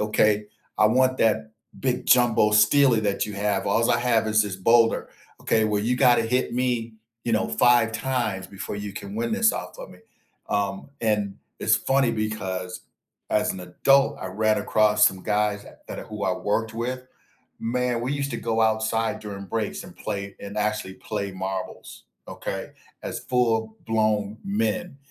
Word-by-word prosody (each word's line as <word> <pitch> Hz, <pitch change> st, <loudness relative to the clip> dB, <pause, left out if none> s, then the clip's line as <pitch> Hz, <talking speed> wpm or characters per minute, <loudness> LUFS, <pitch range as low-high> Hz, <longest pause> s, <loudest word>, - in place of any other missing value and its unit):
"Okay, 105 Hz, 0 st, +2 dB, 0.3 s
I 105 Hz, -, +5 dB
want 130 Hz, +3 st, +2 dB
that 110 Hz, 0 st, +1 dB, 0.3 s
big 130 Hz, -2 st, -1 dB
jumbo 120 Hz, -4 st, +4 dB
steely 115 Hz, +3 st, +5 dB
that 100 Hz, -2 st, 0 dB
you 105 Hz, -, -6 dB
have 100 Hz, -1 st, -1 dB
alls 115 Hz, +3 st, +2 dB
I 120 Hz, -, +3 dB
have 120 Hz, -2 st, +2 dB
is 110 Hz, 0 st, +3 dB
this 100 Hz, -2 st, -4 dB
boulder, 115 Hz, +4 st, +3 dB, 0.3 s
okay, 110 Hz, -1 st, +2 dB
where 105 Hz, -1 st, 0 dB
you 125 Hz, +3 st, +1 dB
gotta 125 Hz, -3 st, +5 dB
hit 125 Hz, +3 st, 0 dB
me, 120 Hz, -2 st, -1 dB, 0.3 s
you 115 Hz, -, -1 dB
know, 110 Hz, -, +1 dB
5 120 Hz, -2 st, +4 dB
times 110 Hz, -6 st, -2 dB
before 100 Hz, +1 st, -6 dB
you 105 Hz, -1 st, -5 dB
can 200 Hz, -, -8 dB
win 230 Hz, +1 st, -2 dB
this 225 Hz, -1 st, +3 dB
off -, -, -6 dB
of -, -, -8 dB
me." -, -, -16 dB, 0.5 s
Um, 100 Hz, +1 st, -2 dB
and 105 Hz, -3 st, 0 dB, 0.2 s
it's -, -, +4 dB
funny 135 Hz, -2 st, +2 dB
because 95 Hz, -4 st, -3 dB, 0.5 s
as -, -, +2 dB
an 95 Hz, -, -8 dB
adult, 135 Hz, +10 st, +3 dB
I -, -, -4 dB
ran 110 Hz, +3 st, +1 dB
across 105 Hz, 0 st, +4 dB
some 95 Hz, -1 st, -1 dB
guys 105 Hz, -1 st, 0 dB, 0.2 s
that -, -, -6 dB
are -, -, -6 dB
who 105 Hz, -1 st, -5 dB
I 95 Hz, -, +1 dB
worked 105 Hz, +4 st, -1 dB
with, 125 Hz, +2 st, -3 dB, 0.6 s
man, 125 Hz, +1 st, -1 dB
we 130 Hz, +4 st, -1 dB
used 140 Hz, -1 st, -2 dB
to -, -, -3 dB
go 115 Hz, -1 st, 0 dB
outside 110 Hz, 0 st, +1 dB
during 100 Hz, -2 st, -7 dB
breaks 110 Hz, -, -3 dB
and 175 Hz, +1 st, -13 dB
play 100 Hz, -2 st, -5 dB
and 100 Hz, 0 st, -8 dB
actually 105 Hz, -2 st, -1 dB
play 100 Hz, -2 st, -4 dB
marbles, 95 Hz, 0 st, -6 dB, 0.2 s
okay, -, -, -5 dB, 0.3 s
as -, -, -4 dB
full 115 Hz, -3 st, 0 dB
blown 110 Hz, -1 st, 0 dB
men, 195 Hz, -6 st, -1 dB
110 Hz, 170 wpm, -24 LUFS, 105-120 Hz, 0.6 s, I